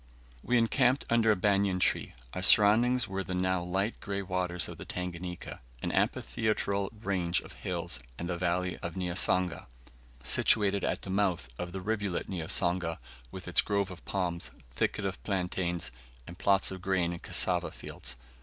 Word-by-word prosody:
We 125 - +2
encamped 125 +3 +3
under 115 -1 +4
a - - +4
banian 100 -1 +2
tree; - - +1 0.2
our 90 - -3
surroundings 110 +6 +5
were 95 0 -3
the 90 - -4
now 95 0 +1
light 95 +5 -1
grey 100 -1 -3
waters 90 -2 -1
of - - -9
the - - -6
Tanganika, 90 0 -5 0.2
an - - -1
amphitheatral 100 - 0
range 90 -4 +1
of - - -12
hills, 85 -1 -3 0.2
and 85 - -4
the 90 - -1
village 90 +1 -1
of 85 -1 -5
Niasanga, 90 -2 +1 0.6
situated 100 - +4
at - - -1
the 95 - -4
mouth 95 -8 +1
of 90 0 -4
the 95 +1 -5
rivulet 100 -2 -2
Niasanga, 85 -1 +1 0.3
with 90 +7 -9
its 90 - +5
grove 100 -1 0
of 90 - -10
palms, 90 -3 -2 0.2
thicket 100 - -1
of 95 - -3
plantains, 90 -3 -1 0.3
and 85 +4 -11
plots 100 -1 +3
of 95 -1 -6
grain 95 -2 +1
and 85 - -8
cassava - - +1
fields. 65 0 -7
95 Hz, 165 wpm, -30 LUFS, 90-100 Hz, 0.6 s, surroundings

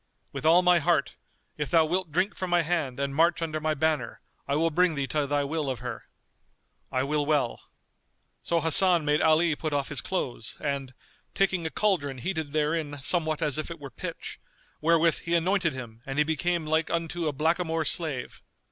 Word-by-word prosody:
"With 155 - -2
all 175 +3 +6
my 180 -1 +5
heart: 155 - +1 0.4
if 150 -3 -3
thou 160 +2 +4
wilt 180 +1 -1
drink 185 +6 +1
from 185 - -4
my 175 -1 +3
hand 155 -6 -1
and 140 0 -1
march 170 +3 +3
under 155 -2 -2
my 155 0 0
banner, 155 +1 -1 0.3
I 140 - 0
will 165 +2 +2
bring 175 0 +3
thee 140 -1 -1
to 145 +1 -1
thy 145 0 +1
will 150 0 -2
of 130 - -2
her." 120 0 -7 0.8
"I 130 -1 +1
will 145 +1 0
well." 145 -5 0 0.8
So 170 -1 0
Hasan 170 +1 +3
made 150 +1 +2
Ali 160 0 +4
put 155 0 -4
off 140 -1 -1
his 140 -5 -2
clothes; 125 - -3
and, 140 -3 -3 0.4
taking 185 -4 +1
a - - -3
cauldron 160 -10 0
heated 160 +1 -3
therein 150 -1 -1
somewhat 160 +1 +2
as 150 0 0
it 165 +2 -5
were 140 -3 -9
pitch, - - -7 0.4
wherewith 165 +1 +3
he 170 0 -1
anointed 175 -1 +1
him 120 -3 -9
and 135 +1 -4
he 150 - +5
became 165 +2 -1
like 160 +1 +1
unto 170 0 -2
a - - +1
blackamoor 160 +2 0
slave. 150 -5 -1
155 Hz, 190 wpm, -27 LUFS, 145-170 Hz, 0.8 s, all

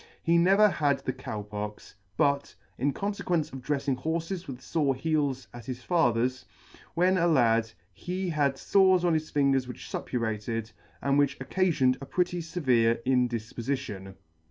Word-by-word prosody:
He 170 0 +4
never 195 +5 +6
had 145 -7 +1
the 130 - -2
Cow 110 -5 -6
Pox; 105 0 -7 0.2
but, 140 -2 +1 0.2
in 140 +3 +2
con 200 +7 -2
fequence 175 -7 -1
of 135 - -6
dreifing 140 -1 -1
horfes 165 +3 -3
with 130 -3 -7
fore 140 +1 0
heels 140 -2 -1
at 120 -2 -10
his 125 -1 -5
father's, 130 -6 +1 0.5
when 180 +2 +3
a 170 - +3
lad, 115 -7 +3 0.2
he 180 - -4
had 145 -4 +1
fores 185 0 +4
on 175 - +3
his 155 0 -1
fingers 135 -3 +2
which 125 - -8
fuppurated, 115 -1 -3 0.3
and 140 +1 +3
which 140 -1 +2
occafioned 150 -9 +1
a 135 - -7
pretty 180 -1 0
fevere 125 -9 +2
indifpofition. 120 -4 -2
140 Hz, 155 wpm, -28 LUFS, 120-170 Hz, 0.5 s, never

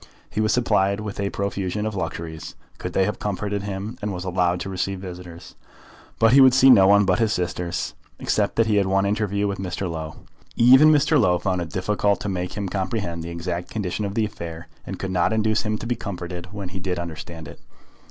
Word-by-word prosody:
He 110 - -1
was 110 - +2
supplied 100 -5 +2
with 105 -2 -6
a 100 0 0
profusion 100 +1 -2
of 110 - -2
luxuries, 80 -3 -5 0.2
could - - -5
they 95 - +3
have 105 - -3
comforted 105 0 -2
him; 100 +4 -5
and 105 0 -2
was 90 -1 -5
allowed 90 -1 +1
to - - -4
receive 95 +1 -2
visitors. 90 -2 -9 0.6
But 115 +1 +4
he 135 - +8
would 130 -1 +7
see 135 0 +7
no 95 -6 +7
one 100 +1 +5
but 90 -1 +2
his 110 -2 +2
sisters, 85 -3 -2 0.2
except - - 0
that 115 - +3
he 110 -2 +2
had 100 -1 +2
one 95 +1 +2
interview 100 0 0
with 100 -1 -3
Mr. 95 0 -3
Low. 80 -2 -5 0.4
Even 130 +6 +7
Mr. 150 0 +4
Low 90 -3 +3
found 90 0 -1
it 85 - -5
difficult 100 +3 0
to 100 - -3
make 90 -1 -3
him 100 -1 -2
comprehend 95 -3 -3
the 85 - -6
exact 85 +1 -4
condition 105 -1 -3
of 100 0 -3
the 110 - +2
affair, 85 -5 -7 0.2
and - - -5
could 95 - -4
not 90 +3 +2
induce 110 0 +2
him 110 0 -1
to 110 - -8
be 120 +1 0
comforted 90 -4 -6
when 100 -3 -6
he 95 +2 -6
did 90 -1 -2
understand 80 -1 -7
it. - - -11
95 Hz, 220 wpm, -23 LUFS, 90-105 Hz, 0.6 s, he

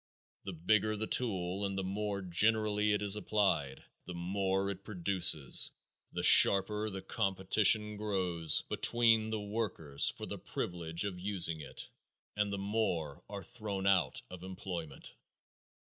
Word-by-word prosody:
The 95 - -5
bigger 110 +5 +1
the 110 - -2
tool 95 -5 -1
and 100 -1 -3
the 95 - -2
more 100 +1 -3
generally 105 +3 +1
it 105 0 0
is 100 0 0
applied, 100 -10 -1 0.2
the 90 - -8
more 95 +2 -1
it 95 0 -9
produces, 90 -7 0 0.4
the - - -4
sharper 105 +2 +6
competition 105 +1 +3
grows 90 -6 +1
between 115 -2 +2
the 110 -1 -3
workers 100 -9 -1
for - - -7
the - - -7
privilege 85 +1 -3
of 95 -3 -5
using 90 -4 +1
it - - -7 0.5
and 105 -1 -1
the 100 - -3
more 100 -8 -2
are - - -7
thrown 100 -3 -5
out 95 -4 +1
of 90 -1 -9
employment. 90 -5 -7
100 Hz, 135 wpm, -32 LUFS, 90-105 Hz, 0.5 s, sharper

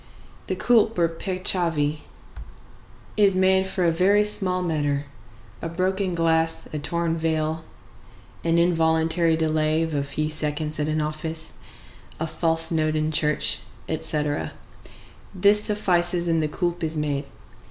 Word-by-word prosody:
The - - -1
coulpe 225 -3 +2
or 170 -1 +3
peccavi, 165 -4 +1 1.2
is 200 -3 +4
made 190 0 +3
for 190 -1 -1
a 170 - +4
very 200 +5 +3
small 185 -3 0
matter—a 140 - -4
broken 185 +2 -1
glass, 165 -1 +1
a 150 - -2
torn 170 +2 -1
veil, 160 -1 -1 0.8
an 165 0 +2
involuntary 165 -1 +2
delay 155 0 +1
of 160 -1 -3
a 140 -1 0
few 150 +2 -2
seconds 150 0 0
at 150 - 0
an 155 0 0
office, 160 +1 -4 0.7
a 160 - -1
false 165 +1 -1
note 155 -1 +1
in 155 0 0
church, 150 -1 +1 0.3
etc.; 145 - -1 0.8
this 205 +3 +4
suffices, 175 -4 +2
and 165 -1 +2
the 155 - 0
coulpe 175 +2 -3
is 160 0 -2
made. 145 -2 -2
160 Hz, 130 wpm, -24 LUFS, 155-175 Hz, 1.2 s, is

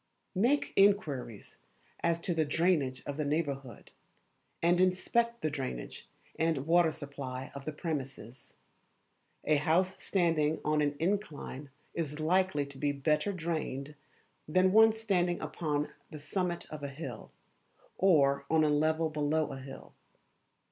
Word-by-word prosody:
Make 240 +10 +2
inquiries 150 - +1 0.4
as 170 0 +1
to 175 - -1
the 160 -1 +2
drainage 150 -4 +1
of 145 0 -4
the 155 - 0
neighbourhood, 140 -4 -3 0.7
and 175 +2 +3
inspect 235 +6 +1
the 155 - 0
drainage 130 - -5 0.3
and 160 -4 +1
water 170 0 +5
supply 140 -3 -6
of 140 -1 -8
the 155 - -2
premises. 135 - -6 0.9
A 155 - +4
house 180 +6 +1
standing 160 -5 +1
on 150 0 +2
an 145 -1 +1
incline 155 -6 -3 0.2
is 150 -2 -3
likely 180 -1 +2
to 140 -1 -11
be 145 0 +1
better 150 +6 +1
drained 155 -5 -3 0.5
than 185 +4 +3
one 220 +2 +7
standing 190 -6 0
upon 150 -3 -2 0.2
the 155 - -8
summit 175 +4 -2
of 155 -1 -6
a 140 - -3
hill, 135 -5 -8 0.7
or 140 -7 +4
on 160 -1 +4
a 155 - +3
level 155 +2 +2
below 155 0 0
a 135 - -6
hill. 135 +1 -10
155 Hz, 135 wpm, -31 LUFS, 140-175 Hz, 0.9 s, one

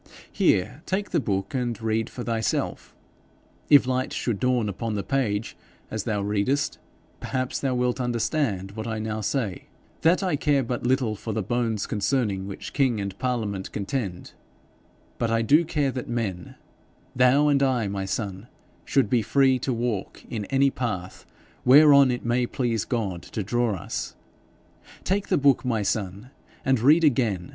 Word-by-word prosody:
'Here, 125 +11 +1
take 200 +2 -2
the - - +2
book, 100 -6 -2
and 120 -4 -2
read 110 0 -1
for 125 - -7
thyself. 115 -1 -2 0.7
If 145 -2 +7
light 130 0 -1
should 115 -5 -2
dawn 125 -3 +1
upon 105 +2 -3
the 100 - -2
page, 115 -6 -1 0.4
as 110 -2 -3
thou 105 -3 -1
readest, 105 +9 0 0.4
perhaps 130 -1 -2
thou 135 -2 -1
wilt 125 +1 0
understand 115 -5 -1
what 110 +2 -6
I 110 -1 -2
now 110 0 -3
say 105 -6 -2 0.4
that 170 +4 +3
I 180 -5 +1
care 140 -2 +2
but 120 0 -3
little 125 -4 +1
for 110 +2 -5
the 110 - -1
bones 115 -1 -1
concerning 105 -3 -1
which 100 - -7
king 130 -6 +2
and 100 -1 -4
parliament 110 -7 -2
contend, 100 -3 -4 0.9
but 115 - 0
I 115 0 +1
do 150 +9 +5
care 150 -4 0
that 125 -1 -6
men 105 -7 -3 0.6
thou 125 +4 +4
and 140 -1 +3
I, 130 -6 +2
my 100 -1 -3
son 100 +1 -4 0.4
should 135 -5 +2
be 120 +2 +2
free 130 +3 +3
to 130 - -2
walk 115 -4 -3
in 110 -3 -3
any 135 +4 +2
path 100 -9 -4 0.4
whereon 140 0 +7
it 125 -1 -2
may 120 +1 +1
please 120 -5 -1
God 100 -8 -2
to 105 - -5
draw 120 +1 0
us. 85 - -5 0.9
Take 200 +2 0
the - - +2
book, 140 -2 +3
my 115 -5 0
son, 100 +4 -3 0.3
and 135 -3 +3
read 150 +8 +5
again. 115 - +1
120 Hz, 165 wpm, -25 LUFS, 105-130 Hz, 0.9 s, If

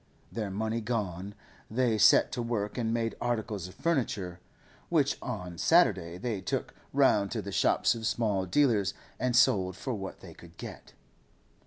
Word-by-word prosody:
Their 110 -3 -3
money 110 +4 -2
gone, 100 -4 -3 0.3
they 115 -1 +1
set - - +6
to 120 - -2
work 110 -3 -2
and 115 -2 -1
made 115 -1 0
articles 110 -6 -2
of 90 - -13
furniture, 110 - -1 0.5
which - - +2
on 90 -2 -5
Saturday 95 - +3
they 105 0 -3
took 95 - -3 0.2
round 130 -8 +3
to 110 - -2
the 100 - -6
shops - - +3
of 115 -1 -3
small 105 -6 0
dealers 110 -4 +2 0.2
and 125 -2 0
sold 95 -6 +3
for 130 - -3
what 95 -3 -6
they - - -11
could 85 -1 -16
get. - - -9
110 Hz, 160 wpm, -29 LUFS, 95-120 Hz, 0.5 s, set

